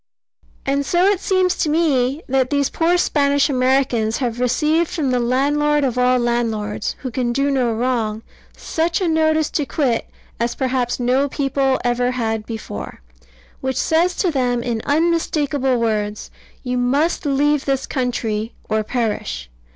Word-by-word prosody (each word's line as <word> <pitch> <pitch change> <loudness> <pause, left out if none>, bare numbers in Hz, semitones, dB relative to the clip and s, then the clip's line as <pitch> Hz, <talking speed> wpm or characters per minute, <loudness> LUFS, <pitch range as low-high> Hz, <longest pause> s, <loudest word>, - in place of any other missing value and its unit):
And 280 +1 +1
so 350 +6 +2
it 400 -2 +3
seems 370 -2 +2
to 310 - 0
me 295 -3 +1
that 260 -1 +1
these 285 -1 +1
poor 340 +2 +2
Spanish 285 -3 +2
Americans 255 -4 +1
have 240 -3 -2
received 305 +7 +1
from 290 -6 -1
the 250 - +2
Landlord 290 +4 +1
of 255 -3 0
all 250 0 +3
landlords, 230 -4 -1
who 255 - -3
can 240 0 -1
do 275 +3 +1
no 255 -4 +1
wrong, 225 -2 -1 0.3
such 330 +1 -1
a 370 - 0
notice 315 -1 +2
to 295 - -1
quit 245 -2 0 0.3
as 235 0 -1
perhaps 255 -2 -1
no 255 +3 +1
people 270 -1 0
ever 245 0 +1
had 225 -3 -2
before; 220 - -7 0.6
which 265 -1 -2
says 340 +5 +2
to 360 - +1
them 245 -4 0
in 235 -2 -2
unmistakable 290 -4 +1
words, 215 -2 -2 0.3
"You 250 -1 -1
must 280 +7 +1
leave 285 +1 +2
this 270 -1 0
country: 230 -4 -2
or 215 0 0
perish." 210 - -3
260 Hz, 150 wpm, -20 LUFS, 240-295 Hz, 0.6 s, it